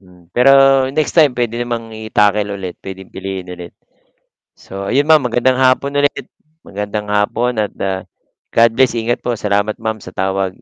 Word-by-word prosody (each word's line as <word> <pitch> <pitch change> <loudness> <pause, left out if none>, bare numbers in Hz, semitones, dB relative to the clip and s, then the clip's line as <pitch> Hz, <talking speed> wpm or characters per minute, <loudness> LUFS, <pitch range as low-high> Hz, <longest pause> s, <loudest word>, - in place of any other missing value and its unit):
Hmm, 90 -2 -21
pero 125 +8 +4 0.4
next 155 -1 +1
time 150 -5 +5
puwede 120 -1 -2
namang 120 -2 -4
i-tackle 105 -2 0
ulit, 95 -3 -7
puwedeng 95 -1 -10
piliin 95 -2 -6
ulit. 90 -1 -9 0.8
So, 100 +1 -7
ayun 140 +3 +2
Ma'am 155 -1 +5
magandang 125 +2 +2
hapon 130 +2 +2
ulit, 145 - 0 0.4
magandang 105 +1 -4
hapon 110 +3 0
at, 105 - -1
ah, 95 -1 -2 0.5
God 115 0 +4
bless. 125 -1 +2
Ingat 115 +1 -1
po, 120 -1 -2
salamat 105 0 -1
Ma'am 110 -1 -4
sa - - -9
tawag. 95 0 -2
105 Hz, 165 wpm, -17 LUFS, 95-120 Hz, 0.8 s, time